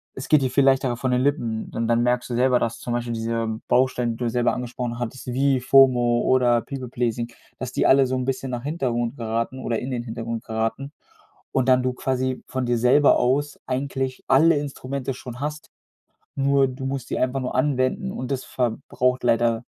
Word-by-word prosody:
es 135 - -6
geht 150 -3 +5
dir 130 - 0
viel 140 +2 +3
leichter 135 -2 +3
von 130 +2 -2
den 125 0 +2
Lippen, 120 -6 -1
und 115 0 -1
dann 115 0 +2
merkst 125 +1 0
du 120 - -2
selber, 125 0 +3
dass 115 0 -2
zum 120 - -4
Beispiel 120 0 -2
diese 115 -1 -2
Bausteine, 125 -2 +2
die 115 - -6
du 120 -2 -1
selber 120 +1 +1
angesprochen 125 -1 -4
hattest 120 +2 -5
wie 135 0 +2
FOMO 125 -2 +4
oder 120 -2 +3
People-Pleasing, 120 -3 -3 0.3
dass 130 -1 -5
die - - +1
alle 135 0 +6
so 130 - -3
‘n 130 - -1
bisschen 135 0 -3
nach 120 -1 -3
Hintergrund 130 -4 -2
geraten 115 +2 -2
oder 115 -3 -2
in 130 - -5
den 120 -2 -3
Hintergrund 115 -1 -5
geraten. 115 +5 -3 0.6
Und, 130 -1 0
dann 130 0 +5
du 130 -1 0
quasi 130 0 -2
von 130 -1 -2
dir 120 - +1
selber 130 +5 +5
aus 145 +4 0
eigentlich 130 0 -3
alle 160 +5 +5
Instrumente 135 -1 -4
schon 125 -1 -9
hast. 150 +1 -5 0.7
Nur, 140 -1 +3
du 130 +1 -6
musst 135 -2 -4
sie - - -2
einfach 130 +1 0
nur 125 - -4
anwenden 135 +8 0
und 125 +1 -5
das 130 -1 -2
verbraucht 125 +1 -1
leider 115 0 +2
125 Hz, 195 wpm, -23 LUFS, 120-135 Hz, 0.7 s, alle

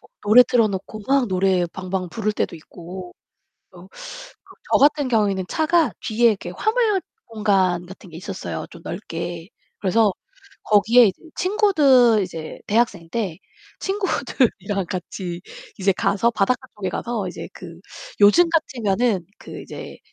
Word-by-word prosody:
뭐 - - -23
노래 215 +4 +8
틀어 235 -3 +3
놓고 200 +2 -6
막 270 -2 +3
노래 185 -1 +2
방방 185 -1 -4
부를 215 -2 -1
때도 170 - -2
있고. 175 +3 -10 0.6
그래서 - - -15 0.6
그 - - -22 0.2
저 - - +6
같은 290 -1 +3
경우에는 205 -5 +1
차가 320 - +2
뒤에 230 +2 +3
이렇게 200 -5 -2
화물 435 -3 +1 0.3
공간 195 -6 +1
같은 185 -1 -13
게 160 - -10
있었어요, 190 +2 -6
좀 170 - -13
넓게. 170 -2 -6 0.3
그래서 205 +1 +3 0.5
거기에 225 +3 +5
이제 190 - -2 0.2
친구들 295 - +4
이제 165 -4 -7
대학생 205 -6 0
때 195 -8 -3 0.4
친구들이랑 230 - -1
같이 180 -1 -5 0.4
이제 195 0 +2
가서 210 +5 +1
바닷가 245 +5 0
쪽에 190 -3 -3
가서 225 -3 -3
이제 180 - -7
그 170 -1 -11 0.4
요즘 205 +13 +7
같으면은 235 - 0
그 - - -9
이제 - - -9
205 Hz, 290 characters per minute, -22 LUFS, 185-245 Hz, 0.6 s, 노래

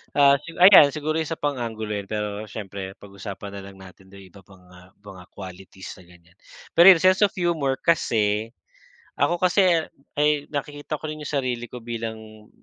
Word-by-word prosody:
Ah, 140 -1 +5
sigu 170 0 -11
ayan 185 -7 +9
siguro 155 +1 -2
isa 160 +1 -3
pang 145 -4 -3
anggulo 110 -2 -5
yun, 100 -1 -5
pero 105 0 -4
siyempre 100 -2 -8
pagusapan 100 0 -9
na 100 -1 -8
lang 100 - -13
natin 95 0 -15
dito 100 - -15
yung 95 - -16
iba 100 - -16
pang, 95 -2 -19
ah, 90 +1 -17
mga 95 -3 -13
qualities 95 0 -11
na - - -15
ganyan. 90 +2 -22 0.4
Pero 170 +2 +7
yun, 175 -4 +7
sense 185 0 +4
of 205 - -20
humor 160 -7 0
kasi, 110 -9 +1 0.7
ako 175 - +1
kasi 180 -3 +3 0.3
ay 150 -1 +1
nakikita 145 +1 -5
ko 155 - -7
rin 155 0 -7
yung - - -6
sarili 125 -4 -3
ko 125 - -8
bilang 110 -2 -8
115 Hz, 185 wpm, -23 LUFS, 100-150 Hz, 0.7 s, ayan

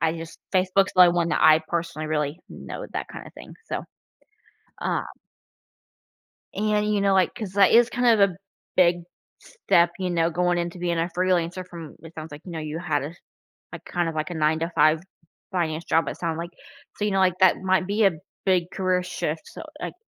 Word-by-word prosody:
I 160 0 +1
just 165 0 -9
Facebook's 190 +1 +2
the 180 -1 +9
one 170 -1 +1
that - - 0
I 155 0 +7
personally 165 -2 -3
really 150 +1 -1
know - - -8
that - - -3
kinda - - -9
thing, - - -11
so, - - -3 1.0
um. - - 0 1.5
And, 210 +1 +1
you 205 - +1
know, 195 -1 +3
like, 190 -2 +3
'cause, 205 -5 -6
like, 200 -1 +5
it's 235 +1 +6
kind 245 -3 +3
of 200 - +6
a 180 - -13 0.4
big 175 -1 +4 0.4
step, 170 - +2
you 185 - -1
know, 165 -1 +1
going 175 +1 +1
into 175 +1 -3
being 175 -1 -1
a 170 - 0
freelancer 180 0 0
from, 165 -4 -10
it 165 0 -11
sounds 160 -1 -8
like, 145 0 -9
you 180 - -8
know, 165 - -4
you 155 +1 -5
had 155 -5 -1
a, 150 +4 -6 0.6
like, - - -9
kind 175 -1 -1
of, 165 - -4
like, 155 +1 -3
a - - -4
9-to-5 160 0 +2 0.5
finance 165 -3 -1
job, 165 0 +1
it - - -5
sounded 165 -2 -3
like, 170 +1 -5 0.5
so, 210 - -2
you 210 - 0
know, 195 - +2
like, 185 -1 +2
that 185 -2 +6
might 190 -1 +1
be 210 +2 +1
a 195 - +6 0.3
big 185 -3 +3
career 185 -1 +1
shift, 165 -3 -3
so, - - -10 0.2
like, - - -5
175 Hz, 200 wpm, -24 LUFS, 165-185 Hz, 1.5 s, the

